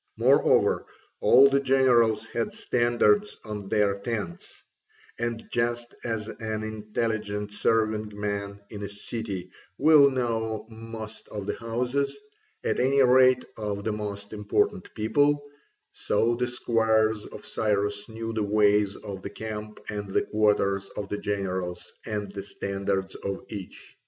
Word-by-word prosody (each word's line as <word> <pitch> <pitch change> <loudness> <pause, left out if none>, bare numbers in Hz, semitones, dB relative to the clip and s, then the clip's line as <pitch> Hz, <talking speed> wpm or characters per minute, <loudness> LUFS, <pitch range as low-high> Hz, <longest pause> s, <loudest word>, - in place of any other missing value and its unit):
Moreover, - - +4 0.3
all 135 +2 +7
the 140 0 +3
generals 125 -5 +3
had 115 -1 -1
standards 125 - +2
on 105 -2 -6
their 100 -1 +2
tents; 100 -6 -5 0.6
and 120 -1 -3
just 120 0 -1
as 110 -2 -2
an 110 -1 -4
intelligent 105 -1 -3
serving 110 0 +1
man 100 -1 -3
in 105 -2 -7
a 100 - -4
city 100 -3 -5 0.3
will 145 -1 +7
know 115 -4 -1
most 110 -1 -8
of 105 -2 -6
the - - -1
houses, 125 +4 -1 0.5
at - - 0
any 135 +2 +4
rate 130 0 +5
of 100 -1 -3
the 110 - 0
most 100 -1 -5
important 185 - 0
people, 145 +6 +2 0.5
so 115 +3 +1
the 125 +1 0
squires 110 -3 +2
of - - -10
Cyrus 105 -1 -1
knew 115 0 -5
the 110 - -1
ways 105 -1 +3
of 95 -2 -7
the 100 - -5
camp 105 0 -6
and 105 -1 -4
the - - +1
quarters 100 -2 +1
of 100 -1 -4
the 105 - -2
generals 95 -3 -3
and 105 -2 -3
the 100 0 -5
standards 95 -1 -2
of 100 0 -5
each. 100 -4 -9
110 Hz, 135 wpm, -27 LUFS, 100-120 Hz, 0.6 s, all